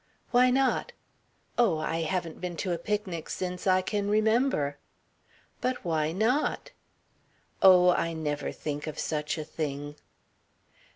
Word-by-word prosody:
"Why 250 0 +5
not?" 265 +1 +1 0.7
"Oh, 210 -10 +4
I 155 +1 -2
haven't 170 -1 -3
been 180 -2 -4
to 185 +3 -2
a 170 - -1
picnic 205 -6 -3
since 180 0 -4
I 185 0 +4
can 205 +1 -1
remember." 215 - +2 0.8
"But 255 -5 -2
why 160 -2 0
not?" 245 - 0 0.9
"Oh, 180 -1 +7
I 165 -1 0
never 150 -2 -3
think 145 0 -5
of 155 - -5
such 150 0 -2
a 155 - -3
thing." 145 -1 -5
180 Hz, 130 wpm, -28 LUFS, 155-210 Hz, 0.9 s, Oh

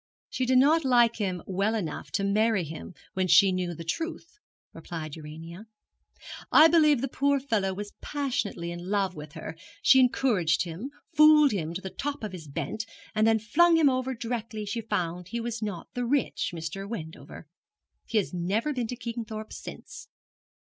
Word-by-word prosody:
'She 255 - -1
did 255 0 +4
not 305 +5 +5
like 240 -3 +4
him 185 -5 -2
well 195 +4 0
enough 170 -9 -4
to 200 - 0
marry 210 0 +2
him 160 +3 -8 0.2
when 185 -1 0
she 195 +2 +6
knew 180 -2 -2
the 165 - -7
truth,' 330 - -5 0.3
replied 155 -4 -7
Urania. 165 +6 -10 0.8
'I 315 +2 +8
believe 305 -6 +4
the 275 - 0
poor 280 +2 +1
fellow 220 -8 0
was 205 +2 -6
passionately 240 - -2
in 175 +1 -7
love 195 -2 +1
with 150 -2 -10
her. 160 -1 -7 0.3
She 265 - +7
encouraged 225 -10 +2
him, 180 +9 -6 0.2
fooled 305 -2 +7
him 170 -4 -3
to 185 - -4
the 190 - -6
top 290 -2 -4
of 215 - -3
his 170 -5 -9
bent, 220 +10 -4 0.3
and 215 0 +3
then 225 0 +4
flung 330 +11 +4
him 305 -4 +5
over 255 0 -1
directly 230 -2 -4
she 230 +3 -3
found 180 -5 -3
he 235 +5 -4
was 235 -1 -4
not 200 -6 -4
the 245 - -2
rich 270 +3 0
Mr. 175 +4 -6
Wendover. 160 -6 -8 0.6
He 225 - 0
has 200 -3 0
never 200 +11 -1
been 245 -4 -2
to 245 - -4
Kingthorpe 230 -3 -6
since. - - -9
215 Hz, 175 wpm, -27 LUFS, 180-255 Hz, 0.8 s, I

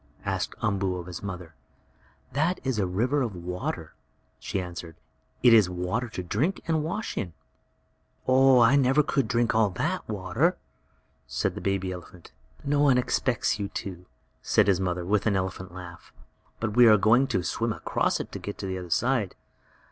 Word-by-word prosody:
asked - - -2
Umboo 100 -3 0
of 90 -1 -6
his 90 -1 -7
mother. 90 -4 -7 0.8
"That 160 +7 +1
is 130 -5 -1
a 95 - +1
river 125 +11 +1
of 115 -7 -2
water," 90 -2 -5 0.5
she 100 - -3
answered. 85 -2 -7 0.5
"It 120 -2 +8
is 105 -5 +6
water 90 +7 -2
to 90 - -5
drink 140 - 0
and 160 -2 +1
wash 180 +8 -3
in." 90 -6 -3 0.9
"Oh, 130 -1 +6
I 115 +4 +6
never 135 +2 +4
could 140 -2 0
drink 120 -1 +1
all 110 -2 +3
that 155 - -3
water," 95 -3 0 0.7
said - - -1
the - - -7
baby 95 -1 -1
elephant. 90 -1 -10 0.3
"No 145 0 +1
one 140 -3 +5
expects 125 -2 0
you 100 - -2
to!" 90 -2 -7 0.3
said - - +3
his 95 -3 +3
mother, 90 -2 -2
with 105 +3 +1
an 100 - +2
elephant 95 -1 -3
laugh. 90 -1 -11 0.5
"But 110 -1 -2
we 120 -1 +8
are 110 -1 +7
going 115 +6 +4
to 95 -9 -1
swim 115 +6 -1
across - - 0
it - - -6
to - - -6
get 100 0 -7
on 95 - -3
the 95 - -3
other 90 -1 -8
side." 120 +1 +1
105 Hz, 180 wpm, -27 LUFS, 90-125 Hz, 0.9 s, It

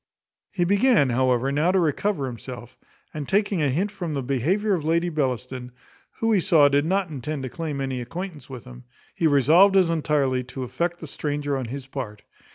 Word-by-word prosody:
He 180 - -1
began, 200 - +3
however, 130 +1 +1
now 150 +5 +2
to 190 - +2
recover 165 0 0
himself; 125 0 -8 0.4
and 150 -3 -6
taking 200 -3 +1
a 145 - +2
hint 185 +10 0
from 175 -7 -4
the 135 - -2
behaviour 170 - 0
of 170 -5 -1
Lady 170 +3 +1
Bellaston, 130 -4 -3 0.4
who 225 0 -1
he 210 - +4
saw 165 -6 +5
did 140 +1 +2
not 185 0 0
intend 145 +1 -4
to 130 - -4
claim 155 0 -4
any 135 -2 -3
acquaintance 165 +5 -7
with 125 -3 -8
him, 125 0 -13 0.3
he 165 - +1
resolved 160 +8 +5
as 180 -3 +4
entirely 145 -5 +1
to 130 +1 -6
affect 170 +8 -3
the - - -6
stranger 145 0 -3
on 130 -2 -3
his 130 +3 -6
part. 125 -6 -7
145 Hz, 190 wpm, -24 LUFS, 130-175 Hz, 0.4 s, saw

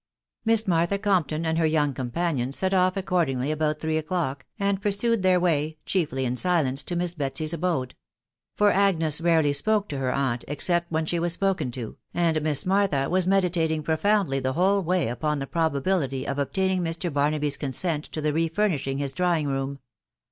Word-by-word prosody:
Miss 225 -1 +2
Martha 170 +2 +2
Compton 175 -6 0
and 160 0 0
her 165 - +3
young 150 -3 +1
companion 130 +1 -2
set 190 +7 0
off 185 0 +2
accordingly 165 -8 0
about 155 0 -1
three 160 0 -1
o'clock, 155 -5 -3
and 200 -1 0
pursued 210 +2 +1
their 185 -1 +4
way, 155 -3 0
chiefly 145 -8 -1
in 125 0 -1
silence, 145 -5 +1
to 175 - -3
Miss 175 0 -1
Betsy's 150 +1 -2
abode; 165 -7 -1 0.6
for 205 0 +4
Agnes 165 -6 +2
rarely 160 -4 +3
spoke 210 +8 +1
to 140 -2 -4
her 130 -1 0
aunt, 130 -3 -1
except 170 +4 0
when 160 0 0
she 170 +2 -1
was 170 0 +1
spoken 185 -8 0
to, 120 -3 -6 0.2
and 165 -2 +1
Miss 150 -2 0
Martha 185 -8 +1
was 185 0 +2
meditating 170 -5 +1
profoundly 165 -2 +1
the 130 0 -1
whole 195 +5 +2
way 180 -3 0
upon 150 +6 -1
the 135 - -3
probability 140 -3 -1
of 140 +1 -2
obtaining 190 +6 0
Mr. 165 0 -2
Barnaby's 145 0 +1
consent 150 +2 -1
to 155 - -6
the 150 0 0
re 165 +2 +1
furnishing 160 -7 -1
his 140 -1 -1
drawing 170 -3 0
room. 135 0 -2
160 Hz, 180 wpm, -25 LUFS, 140-185 Hz, 0.6 s, their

